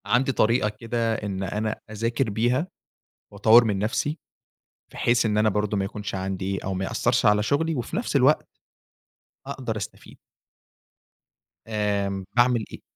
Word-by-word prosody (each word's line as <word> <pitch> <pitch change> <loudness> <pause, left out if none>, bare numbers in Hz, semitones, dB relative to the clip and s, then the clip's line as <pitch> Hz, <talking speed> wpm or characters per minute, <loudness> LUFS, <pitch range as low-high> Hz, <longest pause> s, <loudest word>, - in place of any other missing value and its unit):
عندي 125 +6 +2
طريقة 115 -2 +2
كده 115 +1 -2
إن 100 -3 -4
أنا 105 +3 -2 0.2
أذاكر 115 +3 -1
بيها 120 - +1 0.6
وأطوَّر 110 +4 +6
من 105 -4 0
نفسي 135 +9 -1 0.7
بحيث 120 0 +2
إن 105 -1 +1
أنا 110 0 +4
برضه 105 0 -1
ما 95 - 0
يكونش 105 +1 -5
عندي 95 0 -3
أو 95 - -2
ما 95 +1 -2
يأثَّرش - - +1
على 105 0 +4
شغلي 160 +7 0
وفي 125 +5 -4
نفس 225 -6 -2
الوقت 140 +3 +4 1.0
أقدر 130 -5 -4
أستفيد. 100 - -8 1.5
آمم، 100 -3 -1
باعمل 120 -1 +3
إيه؟ - - -9
110 Hz, 140 wpm, -25 LUFS, 100-120 Hz, 1.5 s, وأطوَّر